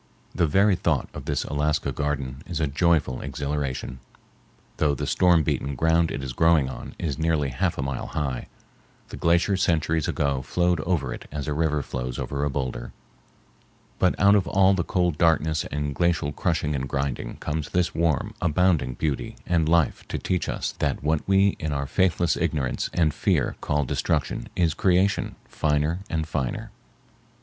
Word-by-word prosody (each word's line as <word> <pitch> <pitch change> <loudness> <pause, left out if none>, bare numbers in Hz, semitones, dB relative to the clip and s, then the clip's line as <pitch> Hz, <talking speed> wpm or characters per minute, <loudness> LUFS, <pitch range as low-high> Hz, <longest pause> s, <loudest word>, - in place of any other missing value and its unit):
The 85 -3 +2
very 100 +6 +4
thought - - 0
of - - -8
this - - -1
Alaska 75 +1 0
garden 70 -2 -3
is 85 -3 -3
a 80 - +2
joyful 75 -2 +1
exhilaration. 70 -2 -3 0.8
Though 75 -2 +2
the 75 - -3
storm 85 +2 +4
beaten 70 -2 -1
ground 80 +4 +3
it 70 - -4
is 65 -2 -4
growing 80 -2 +4
on - - -8
is 80 -3 -3
nearly 80 -3 +1
half 80 +8 -1
a 70 - -1
mile 70 -1 -3
high, 65 -4 -3 0.6
the - - -7
glacier 85 +4 +2
centuries 80 -4 +1
ago 70 -2 0
flowed 90 +4 +1
over 75 -6 -1
it - - -9
as 75 -1 -4
a 75 - 0
river 75 -1 0
flows 60 -1 -4
over 70 0 -3
a 75 - +1
boulder; 65 -3 -4 1.1
but 90 - +2
out 100 +1 +6
of 100 -3 +3
all 95 0 +4
the 90 -2 0
cold 90 -3 0
darkness 80 -2 +2
and 75 -1 -3
glacial 85 -1 +1
crushing 80 -1 -1
and 65 -1 -3
grinding 70 -2 -2
comes 75 -1 -3
this 90 -1 0
warm, 80 -4 0
abounding 80 -6 +2
beauty 75 0 -2
and 80 -3 +1
life 85 -3 +2
to - - -3
teach 90 -3 -1
us - - -2
that - - -1
what 75 0 +1
we 95 +1 +5
in 80 -1 -2
our 70 -1 -1
faithless 90 +1 +2
ignorance 70 -4 -1
and 80 -4 +2
fear - - +1
call 75 -1 0
destruction - - -1
is 85 -3 +2
creation 95 +3 +1
finer 75 +3 0
and 80 -1 -1
finer. 65 -6 -3
75 Hz, 170 wpm, -25 LUFS, 70-85 Hz, 1.1 s, out